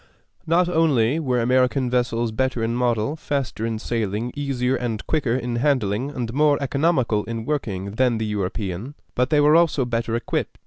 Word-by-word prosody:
Not 170 Hz, +2 st, +3 dB
only 155 Hz, -6 st, +2 dB
were 130 Hz, -6 st, 0 dB
American 125 Hz, +2 st, +2 dB
vessels 120 Hz, -2 st, 0 dB
better 125 Hz, 0 st, -1 dB
in 115 Hz, +1 st, 0 dB
model, 120 Hz, +2 st, 0 dB
faster 135 Hz, -7 st, -3 dB
in 115 Hz, -1 st, -2 dB
sailing, 110 Hz, +1 st, -2 dB
easier 135 Hz, -3 st, 0 dB
and 120 Hz, -4 st, -3 dB
quicker 140 Hz, -7 st, 0 dB
in 120 Hz, -2 st, -2 dB
handling, 125 Hz, -3 st, +1 dB
and 120 Hz, -5 st, -4 dB
more 145 Hz, +1 st, +3 dB
economical 140 Hz, -6 st, +1 dB
in 115 Hz, -1 st, -5 dB
working 100 Hz, -10 st, -3 dB
than 120 Hz, +2 st, +1 dB
the 110 Hz, -, -2 dB
European, 105 Hz, +4 st, -3 dB, 0.2 s
but 125 Hz, +1 st, +1 dB
they 150 Hz, -1 st, +3 dB
were 150 Hz, +1 st, +5 dB
also 165 Hz, -6 st, +3 dB
better 115 Hz, -1 st, -1 dB
equipped. 120 Hz, -, -2 dB
125 Hz, 170 wpm, -23 LUFS, 115-140 Hz, 0.2 s, were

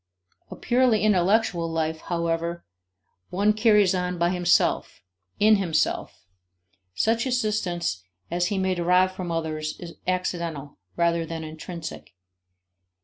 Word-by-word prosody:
A -, -, -7 dB
purely 245 Hz, -3 st, +2 dB
intellectual 195 Hz, -3 st, +2 dB
life, 160 Hz, -1 st, -2 dB
however, 170 Hz, 0 st, -2 dB, 0.6 s
one 205 Hz, +3 st, +2 dB
carries 210 Hz, -3 st, +4 dB
on 180 Hz, -1 st, -2 dB
by 170 Hz, +1 st, +2 dB
himself, 175 Hz, -, +1 dB, 0.4 s
in 215 Hz, +1 st, +6 dB
himself; 170 Hz, -5 st, -1 dB, 0.7 s
such 230 Hz, -, +1 dB
assistance 200 Hz, -, -1 dB, 0.3 s
as 175 Hz, +1 st, +1 dB
he 200 Hz, 0 st, -2 dB
may 190 Hz, 0 st, +1 dB
derive 180 Hz, +1 st, +3 dB
from 185 Hz, -2 st, -5 dB
others 155 Hz, -2 st, -3 dB
is 170 Hz, -2 st, -8 dB
accidental, 170 Hz, -5 st, -3 dB, 0.2 s
rather 170 Hz, -1 st, +2 dB
than 165 Hz, 0 st, -5 dB
intrinsic. 160 Hz, -, -8 dB
175 Hz, 115 wpm, -25 LUFS, 165-200 Hz, 0.7 s, in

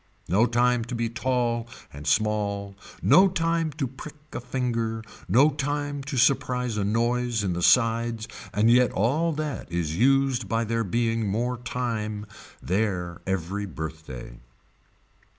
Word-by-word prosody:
No 105 Hz, +7 st, +3 dB
time 120 Hz, 0 st, +2 dB
to 125 Hz, -, -5 dB
be 115 Hz, 0 st, -1 dB
tall 120 Hz, -1 st, -1 dB, 0.3 s
and 70 Hz, +1 st, -8 dB
small 100 Hz, 0 st, 0 dB, 0.3 s
no 190 Hz, +2 st, +7 dB
time 165 Hz, -2 st, 0 dB
to 145 Hz, -1 st, -2 dB
prick 135 Hz, +4 st, -9 dB, 0.2 s
a -, -, -3 dB
finger, 115 Hz, -3 st, -2 dB, 0.3 s
no 135 Hz, +10 st, +5 dB
time 145 Hz, 0 st, -2 dB
to 135 Hz, -1 st, -4 dB
surprise 125 Hz, -2 st, +2 dB
a 105 Hz, -, 0 dB
noise 120 Hz, +1 st, 0 dB
in 95 Hz, -3 st, 0 dB
the 85 Hz, -, -3 dB
sides 115 Hz, +1 st, +3 dB, 0.2 s
and 110 Hz, +3 st, +3 dB
yet 125 Hz, 0 st, +5 dB
all 145 Hz, -, +1 dB
that 150 Hz, -, -4 dB
is 85 Hz, -2 st, -1 dB
used 130 Hz, -1 st, +2 dB
by 115 Hz, +2 st, +1 dB
there 115 Hz, +1 st, -1 dB
being 115 Hz, +1 st, 0 dB
more 120 Hz, +5 st, 0 dB
time 110 Hz, -4 st, -3 dB, 0.4 s
there 90 Hz, -3 st, -1 dB
every 95 Hz, +2 st, -2 dB
birthday. 80 Hz, -7 st, -7 dB
115 Hz, 140 wpm, -26 LUFS, 105-125 Hz, 0.4 s, no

